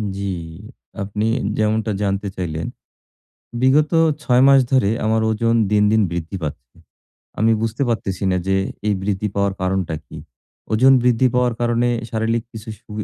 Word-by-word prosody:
জ্বি, 100 -1 -3 0.7
আপনি 105 +2 -3 0.3
যেমনটা 110 0 0
জানতে 100 +1 -1
চাইলেন। 80 -3 -4 0.9
বিগত 145 +4 +3 0.3
৬ 125 -3 +3
মাস 135 -1 +7
ধরে 130 -7 +3 0.2
আমার 110 0 +2
ওজন 115 +1 +1 0.2
দিন, 105 0 +4
দিন 110 0 +3
বৃদ্ধি 85 +3 -4
পাচ্ছে। 65 -4 -7 0.6
আমি 110 +1 +3
বুঝতে 115 +4 -2
পারতেছি 100 -4 -2
না 90 - +1
যে, 95 0 +2 0.3
এই 105 - +2
বৃদ্ধি 105 +1 -1
পাওয়ার 100 -1 +1
কারণটা 95 -3 -1
কি? - - -10 0.5
ওজন 130 +5 +5
বৃদ্ধি 125 +1 +3
পাওয়ার 125 -2 +2
কারণে 120 0 +1 0.2
শারীরিক 115 +1 0
কিছু 110 0 -10
সু 115 -1 -26
110 Hz, 145 wpm, -20 LUFS, 100-120 Hz, 0.9 s, মাস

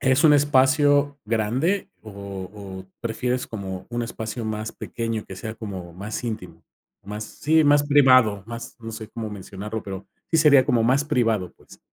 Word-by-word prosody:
¿Es 130 +3 +3
un 155 - +8
espacio 145 0 +4
grande 120 - 0
o 110 - -10 0.4
o 95 -2 -8 0.2
prefieres 125 +2 -2
como 95 -4 -6
un 120 0 -2
espacio 115 0 -5
más 110 0 -3
pequeño 115 -2 -4
que 95 - -9
sea 110 +3 -6
como 95 -6 -7
más 105 +7 -5
íntimo, 90 -8 -6 0.4
más, 105 +2 -5
sí, 155 +8 +2
más 145 0 +5
privado, 130 -8 +5
más 115 0 -7
no 115 0 -7
sé 110 -1 -7
cómo 110 -2 -6
mencionarlo, 105 +2 -6
pero 95 -1 -7 0.2
sí 165 - +3
sería 145 -4 +6
como 120 -2 +2
más 130 +5 +3
privado, 115 -9 0
pues? - - -17
115 Hz, 165 wpm, -24 LUFS, 105-130 Hz, 0.4 s, un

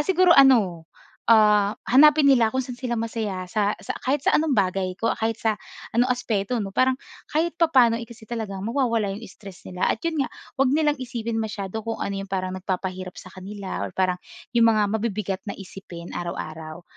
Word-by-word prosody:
Ah, - - +3
siguro 365 -1 +5
ano, 200 -12 +5 0.4
ah, 210 -2 +5
hanapin 300 +3 +6
nila 240 -5 +5
kung 260 - -2
saan 250 -1 -6
sila 240 -3 -2
masaya 215 -5 -3
sa 210 +1 0
sa - - -5
kahit 270 +3 +1
sa - - +3
anong 310 -1 +1
bagay 185 -1 +1
ko 230 - +1
kahit 225 0 -1
sa 220 -2 +1 0.4
ano 245 +2 +3
aspeto, 235 -2 -1
'no? 195 -1 -4
Parang, 260 0 +3 0.3
kahit 330 +3 0
papaano, 255 -8 +5
eh, 230 - -7
kasi 225 -2 -13
talagang 210 -4 -5
mawawala 230 -5 0
yung 215 - -9
stress 195 -4 -13
nila, 180 -1 -1
at - - -1
yun 320 -4 0
nga - - -5 0.3
huwag 270 0 +3
nilang 300 -2 +2
isipin 235 -3 -3
masyado 215 -1 -4
kung 225 - -3
ano 200 0 -2
yung 195 0 -7
parang 185 0 -2
nagpapahirap 185 -1 -4
sa 185 - -13
kanila, 195 +1 -6
or - - -8
parang 185 -1 +1 0.4
yung 230 -1 +6
mga 215 - +3
mabibigat 210 -3 -2
na 200 - -4
isipin 185 -3 -10
araw-araw. 160 -1 -6
220 Hz, 190 wpm, -24 LUFS, 190-250 Hz, 0.4 s, hanapin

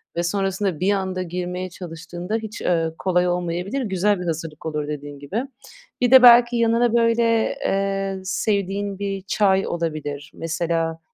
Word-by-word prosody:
ve 170 - 0
sonrasında 195 -1 -1
bir 190 +3 +2
anda 185 -1 -2
girmeye 180 +1 -4
çalıştığında 175 +2 -6
hiç, 220 0 -7
eee, 165 -2 +1
kolay 180 -1 +1
olmayabilir, 180 +8 -2
güzel 200 -2 +1
bir 180 - -5
hazırlık 160 -2 -5
olur 150 -2 -3
dediğin 145 -1 -6
gibi. 195 - -3 0.6
Bir 245 -1 +2
de 260 -1 +9
belki 240 0 +8
yanına, 235 0 +2
böyle, 230 -1 +2
eee, 195 0 -1
sevdiğin 200 +1 -1
bir 195 -1 -3
çay 195 0 +2
olabilir. 155 -3 -4
Mesela, 165 0 -2
185 Hz, 145 wpm, -22 LUFS, 165-205 Hz, 0.6 s, de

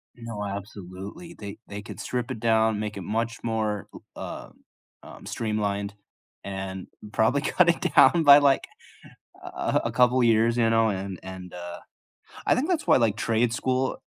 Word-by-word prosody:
No, 115 -3 -6
absolutely. 100 - -8
They 100 -1 -8
they 100 0 -6
could - - -10
strip 125 +1 -3
it 115 - -5
down, 110 -2 +2
make 105 -1 -4
it - - -5
much 115 +4 -2
more 110 -3 -2
l - - -11
uh, - - -7 0.5
um, - - -12
streamlined, 100 -2 -2 0.5
and 95 -1 -5 0.2
probably 125 +7 +2
cut 175 +1 +3
it 170 - 0
down 170 -2 +6
by, 145 0 +9
like, 140 -2 +3 0.8
a - - -9
a - - -1
a - - -1
couple 125 +1 +4
of 120 - +4
years, 115 +1 +3
you 115 -1 +3
know, 115 -1 +3
and 95 -1 -4
and, 95 -1 -9
uh, 85 0 -7 0.7
I - - +4
think 275 +6 0
that's 335 -4 0
why, - - +6
like, 115 -4 +2
trade 115 +1 +1
school 130 +1 -1
110 Hz, 175 wpm, -26 LUFS, 100-120 Hz, 0.8 s, by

